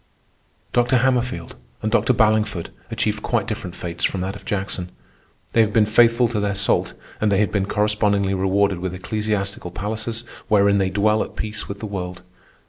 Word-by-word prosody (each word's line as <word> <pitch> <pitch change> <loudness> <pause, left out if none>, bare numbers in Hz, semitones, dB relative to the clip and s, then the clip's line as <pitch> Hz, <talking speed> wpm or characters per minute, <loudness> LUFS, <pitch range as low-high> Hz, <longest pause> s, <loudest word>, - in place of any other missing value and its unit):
Dr. 120 +1 +3
Hammerfield 125 -8 0 0.3
and 110 - 0
Dr. 120 - +3
Ballingford 105 -5 +2 0.2
achieved - - -1
quite - - 0
different 90 -1 -5
fates 85 -1 -6
from 95 - +1
that 95 +2 -3
of - - -11
Jackson. 95 -3 -3 0.6
They 115 - +5
have 110 -1 +1
been 110 -2 +5
faithful 115 +2 +4
to 110 -2 -1
their 100 -1 0
salt, 100 +1 +1 0.2
and 105 -1 +2
they 100 - +3
have 105 0 +2
been 100 -2 0
correspondingly 105 -2 +1
rewarded 95 0 +1
with 95 0 -3
ecclesiastical 100 -1 -2
palaces 110 +5 -4 0.2
wherein 100 -2 +4
they 95 -1 +1
dwell 105 +3 +2
at - - -5
peace 110 -1 -4
with 100 0 -6
the - - -3
world. 90 -3 -5
105 Hz, 175 wpm, -22 LUFS, 95-110 Hz, 0.6 s, They